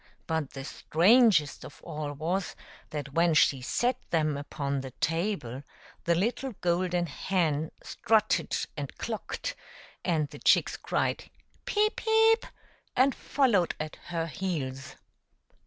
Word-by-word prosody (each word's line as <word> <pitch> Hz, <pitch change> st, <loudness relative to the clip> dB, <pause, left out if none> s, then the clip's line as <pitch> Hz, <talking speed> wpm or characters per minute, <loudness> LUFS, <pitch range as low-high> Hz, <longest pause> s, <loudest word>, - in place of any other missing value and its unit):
But 160 Hz, -4 st, -2 dB
the 135 Hz, -1 st, -6 dB
strangest 180 Hz, -, +4 dB
of -, -, -11 dB
all 150 Hz, -3 st, -4 dB
was, 170 Hz, +5 st, -2 dB, 0.3 s
that 145 Hz, -2 st, -5 dB
when 170 Hz, 0 st, +3 dB
she 135 Hz, -3 st, +4 dB
set 240 Hz, -, 0 dB
them 155 Hz, -3 st, +1 dB
upon 140 Hz, -1 st, -3 dB
the 130 Hz, -, -6 dB
table 165 Hz, -, -1 dB, 0.4 s
the 170 Hz, -, +3 dB
little 240 Hz, +7 st, -1 dB
golden 175 Hz, 0 st, +1 dB
hen 160 Hz, -1 st, 0 dB
strutted 215 Hz, -1 st, +1 dB, 0.2 s
and -, -, -6 dB
clucked, -, -, -4 dB, 0.5 s
and 160 Hz, -4 st, +1 dB
the -, -, -11 dB
chicks -, -, +4 dB
cried, -, -, -2 dB, 0.2 s
" -, -, -37 dB
Peep! 425 Hz, +1 st, +1 dB
peep 445 Hz, +1 st, +4 dB, 0.3 s
!'* -, -, -36 dB
and 260 Hz, +2 st, +5 dB
followed 230 Hz, -13 st, +1 dB
at 155 Hz, 0 st, -5 dB
her 165 Hz, -1 st, -2 dB
heels. 145 Hz, -7 st, -4 dB
170 Hz, 130 wpm, -29 LUFS, 150-210 Hz, 0.5 s, and